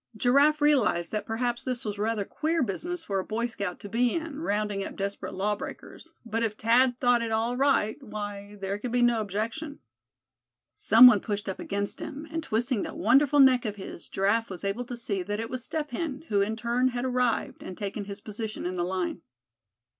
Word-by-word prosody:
Giraffe 280 +6 +4
realized 260 - +3
that 215 - -3
perhaps 240 +1 -1
this 255 -1 -3
was 205 -1 -4
rather 215 -1 0
queer 320 +5 0
business 335 - -3
for 195 -7 -1
a - - -2
Boy 225 +4 -2
Scout 200 -6 -4
to - - -7
be 235 +3 +1
in, 320 -3 -4
rounding 205 -5 -1
up - - -7
desperate 200 0 -4
law 205 +2 0
breakers; 330 +9 -9
but 225 0 -2
if 225 -2 0
Thad 240 +3 +3
thought 245 -2 +3
it 230 -1 -2
all 225 +2 0
right, 270 -4 +2
why, 205 -3 -6
there 195 +1 -3
could 240 +2 -4
be 245 0 +2
no 240 -2 +3
objection. 225 - -4 1.0
Some 230 +3 +7
one 240 -5 +9
pushed 205 0 -4
up 190 - -4
against 200 0 -3
him, 295 +3 -7
and 325 0 -2
twisting 240 -4 0
that - - -5
wonderful 275 +7 +4
neck 260 -3 +6
of 210 -3 -3
his, 190 -3 -8
Giraffe 215 +4 +1
was 185 -1 -8
able 200 +5 -2
to 245 0 -6
see 205 -5 -2
that 205 +3 -3
it 225 +1 -4
was 255 -2 -4
Step 300 +1 -3
Hen, 290 +1 -3
who 200 -1 +3
in 215 +2 0
turn 240 +3 +1
had 245 0 -2
arrived, 250 -2 0
and 185 - -8
taken 205 -1 -4
his 200 0 -6
position 215 -1 -5
in 180 - -2
the 175 -1 -1
line. 180 -1 -2
225 Hz, 205 wpm, -27 LUFS, 205-255 Hz, 1.0 s, one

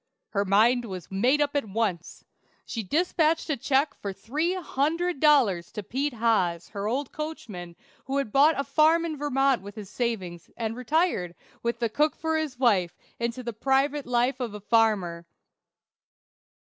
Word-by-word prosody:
Her 200 -2 0
mind 230 +5 +4
was 185 -5 -8
made 250 +10 +2
up 290 0 0
at 280 -7 -1
once. 195 -5 -3 0.4
She 225 - -4
dispatched 320 - +1
a - - +1
check 275 +4 +1
for 200 - -6
three 295 - -2
hundred 335 0 -1
dollars 245 - +3
to 210 - -5
Peter 270 +5 -2
Haas, 185 -7 +1
her 200 0 -4
old 260 +4 -2
coachman, 210 - -7 0.3
who 270 +1 -2
had 275 -6 -1
bought 290 +4 +4
a - - +1
farm 320 +3 +3
in 320 -2 -3
Vermont 275 -3 +1
with 200 +1 -10
his 205 -3 -9
savings, 190 -9 -3
and 225 -1 -2
retired, 250 - 0 0.3
with 235 0 -1
the 235 0 0
cook 295 +8 +1
for 320 0 -1
his 310 -5 -2
wife, 200 -9 +2 0.2
into 235 +2 -3
the 235 -1 -4
private 270 +4 +1
life 245 +2 +1
of 235 -5 -4
a - - -6
farmer. 200 -6 +1
240 Hz, 165 wpm, -26 LUFS, 205-290 Hz, 0.4 s, mind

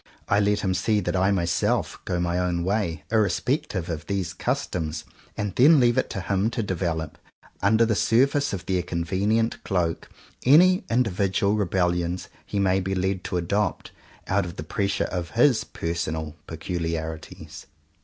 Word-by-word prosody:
I 100 - +3
let 105 0 +2
him 95 -2 0
see 105 +4 +1
that 95 - -2
I 95 +1 +3
myself, 85 -4 0
go 90 - -1
my 85 0 0
own 90 -1 0
way, 90 -5 -1
irrespec 110 - +1
tive 90 -4 -4
of 80 -1 -5
these 95 -4 -2
customs, 80 -3 -2 0.3
and 105 -3 -2
then 150 +4 +7
leave 120 -2 +4
it - - +1
to 95 - -4
him 100 +3 0
to 115 - +1
develop, 85 -5 -3 0.4
under 110 +4 +4
the 110 - +1
surface 135 +7 +2
of 95 -2 -5
their 95 -1 0
convenient 100 +7 -1
cloak, 85 -4 -1 0.3
any 180 +8 +6
individual 100 -4 +1
rebellions 90 -3 0 0.2
he - - -4
may 95 -1 +3
be 95 +1 -2
led 95 0 -1
to 90 - -2
adopt, 100 +4 -1 0.4
out 100 +1 +2
of 90 0 -7
the - - -6
pressure 100 -2 -1
of 90 -2 -3
his 125 -1 +4
personal 80 -2 -4
peculiarities. 80 -1 -5
95 Hz, 160 wpm, -25 LUFS, 85-105 Hz, 0.4 s, then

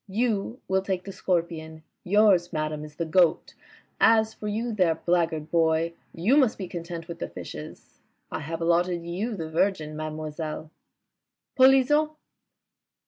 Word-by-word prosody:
You 225 +2 -1
will 190 0 +2
take 190 -2 -2
the 195 - -7
Scorpion. 165 -4 -2 0.2
Yours, 190 -3 +4
madame, 155 -2 -2
is 150 -1 -11
the 170 - -2
Goat. 175 0 +2 0.5
As 220 -1 +4
for 210 - -7
you 225 +3 -2
there, 180 -6 +2
blackguard 165 -2 0
boy, 165 0 +2 0.2
you 210 - +2
must 260 -7 +3
be 190 - -5
content 170 -1 -6
wdth 170 0 -8
the - - -4
Fishes. 75 -4 -10 0.3
I - - -3
have 160 +2 -5
allotted 170 +1 +1
you 200 +7 -3
the 160 -4 -6
Virgin, 160 -3 0
mademoiselle." 155 0 -5 0.4
..." - - -61
Polisson 270 +3 +5
170 Hz, 145 wpm, -26 LUFS, 160-205 Hz, 0.5 s, Polisson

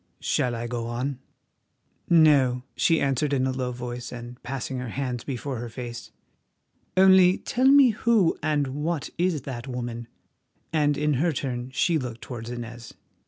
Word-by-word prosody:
"Shall 120 -1 0
I 115 +1 -4
go 120 -1 -3
on?" 125 +3 -3 0.9
"No," 140 -7 +5
she 165 -1 +3
answered 140 +1 0
in 130 -1 +2
a 130 - 0
low 130 -1 -2
voice, 120 0 -6
and 120 0 -9
passing 130 0 -4
her 125 -1 -5
hands 125 -1 -3
before 135 0 -4
her 120 0 -5
face. 120 0 -7 0.9
"Only 190 -1 +6
tell 255 +2 0
me 275 -1 +7
who 215 -5 +2
and 150 -2 +1
what 150 +3 -3
is 170 -6 +1
that 125 -2 -6
woman?" 120 -2 -5 0.7
and 150 -2 +2
in 150 0 +1
her 170 0 +2
turn 125 -3 -4
she 160 +5 +1
looked 120 -3 -6
towards 120 -2 -7
Inez. 120 -1 -8
130 Hz, 160 wpm, -25 LUFS, 120-150 Hz, 0.9 s, me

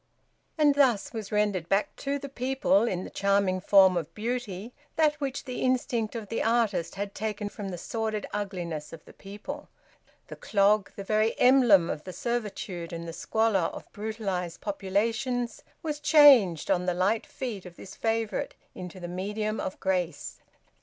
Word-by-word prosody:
And 300 -2 +5
thus 260 -7 +2
was 220 -3 -6
rendered 205 -5 0
back 195 +2 +1
to 280 0 -2
the 280 - -7
people 255 -5 +1
in 185 -4 -2
the - - -8
charming 200 -2 +1
form 190 -1 +6
of 165 -2 -2
beauty 230 -1 -4 0.2
that 310 -2 +4
which 275 -1 -3
the 255 - -5
instinct 245 -3 0
of 225 -3 -5
the 230 - -1
artist 225 -7 +1
had 200 0 -4
taken 210 -1 -3
from 205 -1 -6
the 180 - -5
sordid 220 +3 -3
ugliness 175 -7 -4
of 165 - -11
the - - -15
people. 210 +10 -8 0.6
The - - -8
clog, 200 0 +2
the 200 - -6
very 215 +2 +1
emblem 245 -9 +6
of 150 - -4
the 185 - -8
servitude 205 -6 -4
and 170 0 -6
the 165 - -6
squalor 215 -3 +1
of - - -11
brutalised 200 -5 -3
populations, 225 +5 -1 0.2
was 300 -2 -3
changed, 270 - +6
on 180 0 +1
the 180 - +1
light 200 +5 +1
feet 220 -8 -5
of 175 - -13
this 190 - -11
favourite, 225 -1 -1 0.2
into 180 0 -8
the 175 - -6
medium 210 +4 -3
of 190 - -4
grace. 185 -3 -2
210 Hz, 165 wpm, -28 LUFS, 185-235 Hz, 0.6 s, form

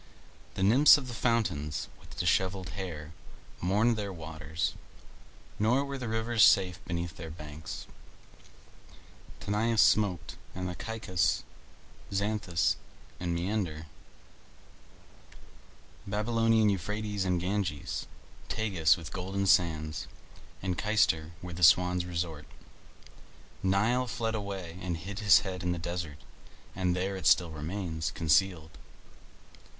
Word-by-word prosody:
The 95 - -1
Nymphs 125 +11 +8
of 135 -3 -6
the 120 - -6
fountains, 105 -12 0
with - - -15
dishevelled 95 -2 +1
hair, 80 -3 -6 0.5
mourned 105 +6 +2
their 100 -2 -3
waters, 80 -1 -4 0.9
nor 125 +6 +3
were 140 -1 -5
the 125 - -4
rivers 115 0 +2
safe 90 -2 +4
beneath 85 -1 -4
their 80 -1 -7
banks: 75 -1 -8 1.5
Tanais 110 +3 0
smoked, 90 -9 +3 0.2
and 90 -1 -4
Caicus, 105 -7 0 0.7
Xanthus, 100 -5 0 0.4
and 85 -1 -2
Meander; 85 -3 -2 2.2
Babylonian 110 +1 +2
Euphrates 105 +2 -2
and 90 -2 +1
Ganges, 90 -5 -2 0.4
Tagus 95 -10 +2
with 80 -3 -9
golden 95 +2 -2
sands, 80 -4 +2 0.6
and 90 -2 -1
Cayster 105 -7 +2
where 90 -1 -7
the 85 - -7
swans 90 +1 +5
resort. 85 -3 -4 1.1
Nile 110 +7 +2
fled 115 -1 -2
away 95 -5 -5
and 90 -3 -2
hid 100 +6 -6
his 100 -4 +6
head 90 -2 -5
in 90 0 0
the - - -4
desert, 85 -3 -4 0.6
and 90 -2 +1
there 95 +2 -1
it 90 -5 -1
still 85 -2 +4
remains 80 +1 -3
concealed. 80 -3 +1
90 Hz, 115 wpm, -30 LUFS, 85-105 Hz, 2.2 s, Nymphs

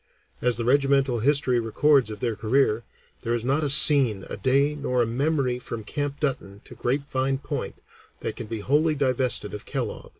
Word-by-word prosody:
As 125 -2 +1
the 115 - -3
regimental 135 -1 +2
history 130 0 +2
records 130 +3 +2
of 105 -2 -8
their 115 -3 -1
career 115 0 +1 0.4
"there 115 +1 -2
is 120 0 -3
not 140 +4 0
a 145 - 0
scene, 135 -8 +5
a - - -3
day, 140 +3 +1
nor 125 -4 -1
a - - 0
memory 130 +1 -1
from 115 -2 -6
Camp 145 +5 -4
Dutton 125 -9 -3
to - - -12
Grapevine 135 0 -1
Point 140 - -6 0.4
that - - -4
can 115 - -8
be 110 -1 -5
wholly 150 +7 +1
divested 130 -6 0
of 105 - -8
Kellogg. - - -5
130 Hz, 185 wpm, -24 LUFS, 115-140 Hz, 0.4 s, scene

